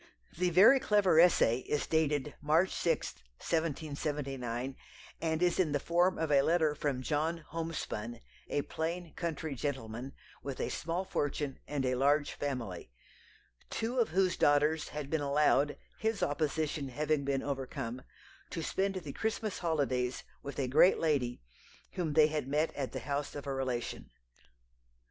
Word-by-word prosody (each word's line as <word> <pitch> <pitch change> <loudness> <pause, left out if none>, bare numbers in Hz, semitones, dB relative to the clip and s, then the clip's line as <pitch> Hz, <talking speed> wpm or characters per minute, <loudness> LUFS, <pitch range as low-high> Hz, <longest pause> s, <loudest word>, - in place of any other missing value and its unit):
The 180 +2 +1
"very 200 +10 +7
clever 205 -9 +4
essay" 165 -9 +5
is 145 +2 -2
dated 150 -3 +1
March 160 +5 +3
6, 165 -2 0 0.2
1779, 140 -6 -2 0.5
and 160 +1 0
is 175 0 +2
in 160 -6 +2
the 145 - +2
form 175 +5 +2
of 160 -1 -1
a 140 -1 +6
letter 160 0 +3
from 140 -3 -2
John 155 +3 -1
Homespun, 155 -8 -4 0.3
a 145 - 0
"plain 165 +1 -4
country 160 -3 -3
gentleman, 130 -1 -4 0.3
with 140 -2 -5
a - - -1
small 170 +3 -2
fortune 145 -5 -2
and 145 -3 -1
a 130 - +1
large 145 +3 +2
family," 120 -11 -4 0.8
two 240 +3 -2
of 235 - +3
whose 185 +1 +2
daughters 150 +2 +3
had 145 -2 -6
been 160 -2 +1
allowed 145 0 +3 0.2
his 220 -1 0
opposition 150 -1 -1
having 150 +2 0
been 135 -1 0
overcome 135 -3 -4 0.5
to 165 - -4
spend 195 +3 0
the 155 -7 -5
Christmas 220 -2 -2
holidays 135 -7 0 0.2
with 140 - -7
a 135 - 0
"great 145 +8 +6
lady" 135 - 0 0.5
whom 165 -5 -2
they 155 0 +7
had 150 -3 -1
met 150 +3 +1
at 135 -3 -3
the - - -5
house 145 0 -3
of 145 - -6
a 140 - -2
relation. 130 -3 -3
150 Hz, 150 wpm, -32 LUFS, 135-165 Hz, 0.8 s, very